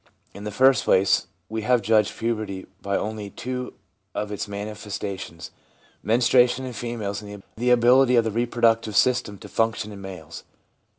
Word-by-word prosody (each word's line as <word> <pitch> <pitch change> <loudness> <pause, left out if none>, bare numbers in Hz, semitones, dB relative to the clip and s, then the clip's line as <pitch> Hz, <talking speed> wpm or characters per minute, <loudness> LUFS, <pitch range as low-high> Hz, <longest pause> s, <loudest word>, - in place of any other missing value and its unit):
In 100 - -9
the 105 - -3
first 130 +1 +4
place, 95 +1 +3 0.2
we 110 +2 -4
have 120 +1 +2
judged 110 0 +2
puberty 110 -5 -3 0.2
by 100 0 -1
only 105 -1 -4
two 125 +3 -5 0.4
of 105 0 -3
its 105 - -4
manifestations, 100 -4 -6 0.5
menstruation 125 +3 +3
in 125 - -6
females 110 -4 -4
and 105 -1 -10
the 120 +2 0
ability 125 +1 +5
of 115 - +5
the 110 - -2
reproductive 115 -1 +1
system 110 -3 +2
to - - -11
function 115 -2 -1
in 100 -1 -9
males. 85 -4 -9
110 Hz, 155 wpm, -24 LUFS, 100-120 Hz, 0.5 s, ability